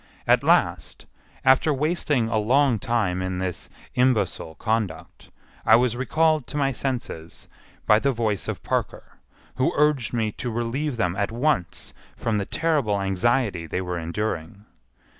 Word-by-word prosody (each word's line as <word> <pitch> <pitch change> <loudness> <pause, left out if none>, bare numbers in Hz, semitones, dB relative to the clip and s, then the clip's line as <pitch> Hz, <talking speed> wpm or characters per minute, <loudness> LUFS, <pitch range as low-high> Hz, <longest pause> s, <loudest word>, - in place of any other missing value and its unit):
At - - +4
last, - - +1 0.4
after 130 +4 +5
wasting 145 -4 0
a 115 -1 0
long 125 +2 +3
time 100 -6 0
in 95 0 -3
this 90 -2 -4 0.2
imbecile 110 -10 +1
conduct, 105 -8 -3 0.3
I - - +6
was 120 0 +2
recalled 155 +3 +1
to - - -5
my 135 -1 +2
senses 120 -11 -5 0.4
by 105 - +5
the 140 +3 +1
voice 110 -5 -1
of - - -4
Parker, - - -3 0.4
who 130 - +2
urged 150 -5 +2
me 110 -3 0
to 125 - -5
relieve 120 +4 -2
them 90 -4 0
at 100 +2 -1
once 120 - -1 0.2
from 110 -2 -1
the 100 - -3
terrible 145 -11 0
anxiety 95 -1 0
they 90 - -2
were 90 -2 -3
enduring. 85 +2 -4
115 Hz, 145 wpm, -24 LUFS, 95-130 Hz, 0.4 s, I